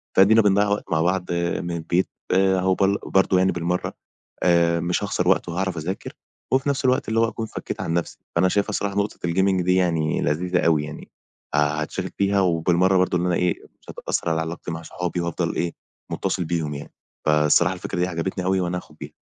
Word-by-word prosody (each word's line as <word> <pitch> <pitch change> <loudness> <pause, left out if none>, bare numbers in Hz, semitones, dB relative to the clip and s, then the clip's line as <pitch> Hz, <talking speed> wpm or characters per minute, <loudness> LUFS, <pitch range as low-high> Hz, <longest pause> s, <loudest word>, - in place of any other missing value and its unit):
فأدينا 110 +4 +6
بنضيَّع 100 0 +3
وقت 100 +1 -1
مع 80 -1 +2
بعض 90 +1 0
من 85 0 -1
البيت 85 +2 0 0.2
أهو" 95 0 +3
بل 100 +1 +2
برضه 95 -1 +3
يعني 95 +1 +3
بالمرّة 90 +1 -2 0.5
آآ 85 -1 +3
مش 85 +3 -1
هاخسر 90 -3 -1
وقت 95 -1 +2
وهاعرف 95 +1 -2
أذاكر 85 +5 -4 0.4
وفي 135 +2 +2
نَفْس 140 -1 -1
الوقت 130 -2 +2
اللي 110 +1 +1
هو 115 - +4
أكون 115 0 -4
فكّيت - - -6
عن 80 - -2
نَفْسي. 85 0 -2 0.2
فأنا 90 +2 +4
شايفها 100 +2 +1
الصراحة 100 -1 -2
نقطة 100 +1 0
الgaming 95 +1 +2
دي 90 +1 +2
يعني 80 -4 +1
لذيذة 90 +5 0
أوي 80 -3 +3
يعني 75 0 -9 0.4
هاتشغِل 75 +1 0
فيها 100 0 +2
وبالمرّة 90 +1 +3
برضه 90 -1 +2
إن 90 - -1
أنا 90 -1 +1
إيه، 90 0 0 0.2
مش - - -18
هتأثّر - - -2
على 80 0 +1
علاقتي 85 +1 -5
مع 80 0 -5
صحابي 90 +1 -3
وهافضل 85 0 -2
إيه، 85 -1 -1 0.4
مُتّصِل 90 - -1
بيهم 80 -3 -2
يعني. 70 - -8 0.3
فالصراحة 75 -1 +4
الفكرة 90 - -5
دي 90 - +2
عجبتني 90 +2 -3
أوي 95 0 +2
وأنا 90 0 -1
هاخُد - - -11
بيها - - -8
90 Hz, 195 wpm, -23 LUFS, 85-95 Hz, 0.5 s, فأدينا